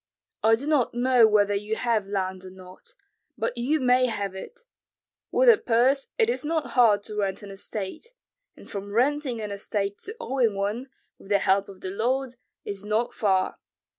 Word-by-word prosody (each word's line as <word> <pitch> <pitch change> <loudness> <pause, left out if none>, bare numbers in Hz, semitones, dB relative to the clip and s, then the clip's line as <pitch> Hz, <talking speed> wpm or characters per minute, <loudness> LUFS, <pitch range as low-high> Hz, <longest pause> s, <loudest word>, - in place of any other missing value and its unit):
I 225 +1 +5
do 255 +5 -7
not 290 -6 +1
know 245 -2 +5
whether 205 -1 +3
you 210 +2 -2
have 225 -4 0
land 190 -2 -3
or 185 - -9
not, 185 0 -14 0.4
but - - -2
you 265 +6 0
may 255 -1 +3
have 200 -4 -3
it; 465 - -10 0.7
with - - +2
a 455 -4 +8
purse 255 +4 +2
it 450 -2 +4
is 475 - -1
not 315 0 -2
hard 215 -5 +4
to 210 - -7
rent 200 -1 -2
an 200 - -9
estate, 200 - -6 0.5
and - - -14
from 200 0 -6
renting 265 0 +1
an 210 -1 -5
estate 200 0 -3
to 430 +4 -8
owning 255 - 0
one, 210 +7 -3 0.3
with 195 - -15
the 205 - +4
help 195 0 +1
of 190 -1 -13
the 185 - -4
Lord, 255 +5 -1 0.3
is 200 -1 -5
not 215 +3 -1
far. 190 -5 0
220 Hz, 185 wpm, -26 LUFS, 200-255 Hz, 0.7 s, a